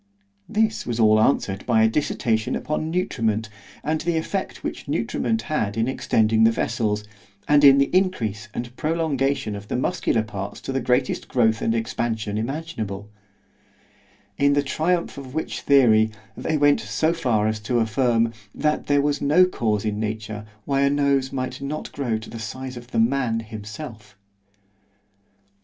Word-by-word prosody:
This 220 0 0
was 120 -1 -2
all 110 -1 +5
answered 100 -6 +1
by 115 -3 +4
a - - +6
dissertation 110 -3 0
upon 155 +1 -2
nutriment, 115 - -1 0.3
and 155 +1 -1
the 170 -1 0
effect 190 +4 -3
which - - -5
nutriment 225 0 -1
had 110 - -1
in 115 +1 +1
extending 110 -4 +2
the 115 - +7
vessels, 110 -2 -1 0.4
and 145 0 +5
in 140 -1 +9
the 140 +5 +2
increase 115 - 0
and 120 +2 -6
prolongation 140 -7 0
of 100 0 -8
the - - -3
muscular 125 -4 0
parts 100 -2 -6
to - - -5
the 135 - 0
greatest 125 +1 0
growth 115 -3 +2
and 115 - +1
expansion 115 -2 -2
imaginable—In 105 -2 -5
the 145 0 +2
triumph 165 +3 -1
of 135 0 -10
which 160 - -3
theory, 110 -6 +5 0.3
they 160 - -1
went 145 0 +4
so 110 +11 0
far 115 -9 +1
as 110 0 -1
to 120 +4 -1
affirm, 115 0 +2 0.2
that 150 0 0
there 145 -1 +3
was 145 0 0
no 155 +6 +5
cause 110 - -1
in 105 -1 -1
nature, 110 -1 -4 0.2
why 140 -1 +1
a 140 - +4
nose 140 -2 +1
might 130 0 -4
not 145 +2 -4
grow 120 -6 -1
to 110 - -9
the 115 - -7
size 130 +4 -6
of 120 0 -9
the 115 - -1
man 115 -1 +2
himself. 110 -1 -9
120 Hz, 160 wpm, -23 LUFS, 110-145 Hz, 0.4 s, in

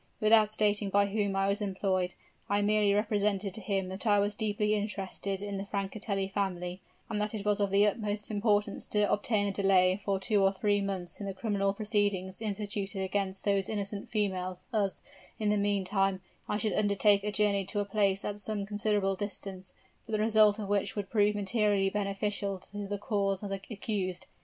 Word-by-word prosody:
Without 215 0 +5
stating 210 -1 +1
by 200 +1 +4
whom 200 -1 -1
I 195 0 +2
was 200 +2 0
employed, 190 -2 -1 0.3
I 205 0 +2
merely 210 0 +3
represented 205 -1 +1
to 220 - -7
him 195 -1 -1
that 190 +5 -5
I 205 -1 +5
was 205 +1 +1
deeply 210 -1 0
interested 200 -1 -3
in 200 -1 -3
the 195 - -4
Francatelli 200 0 -2
family, 180 -2 -2 0.3
and 210 -1 -2
that 210 +1 -2
it 205 -1 -5
was 210 0 +2
of 200 -1 +2
the 200 +2 +4
utmost 210 0 -2
importance 205 -1 +1
to 210 -1 +2
obtain 205 0 +1
a 200 - 0
delay 190 -1 +3
for 195 -1 0
two 200 +2 +2
or 195 0 +4
three 205 +1 +1
months 190 -3 -4
in 200 - -4
the 195 - -4
criminal 195 0 0
proceedings 205 -2 -1
instituted 205 -1 -3
against 190 0 -2
those 200 -2 +1
innocent 205 -1 -3
females, 185 -4 -2
as, 200 -3 0 0.4
in 215 -1 0
the - - +3
meantime, 195 -1 +1 0.3
I 210 - +1
should 215 0 0
undertake 205 -1 +3
a 210 - -1
journey 205 -1 +2
to 205 - -2
a 205 - 0
place 200 -1 +1
at 205 0 -3
some 205 -1 -3
considerable 205 -1 0
distance, 190 -2 -6 0.4
but 225 - -6
the 215 - +2
result 215 -1 +5
of 210 -2 -4
which 200 0 0
would 200 -2 -4
prove 210 -1 +3
materially 205 -1 +2
beneficial 200 0 -1
to 205 0 -5
the 205 +1 -2
cause 200 -1 -1
of 200 - -4
the 195 -1 -3
accused. 195 -5 -3
205 Hz, 190 wpm, -30 LUFS, 195-210 Hz, 0.4 s, Without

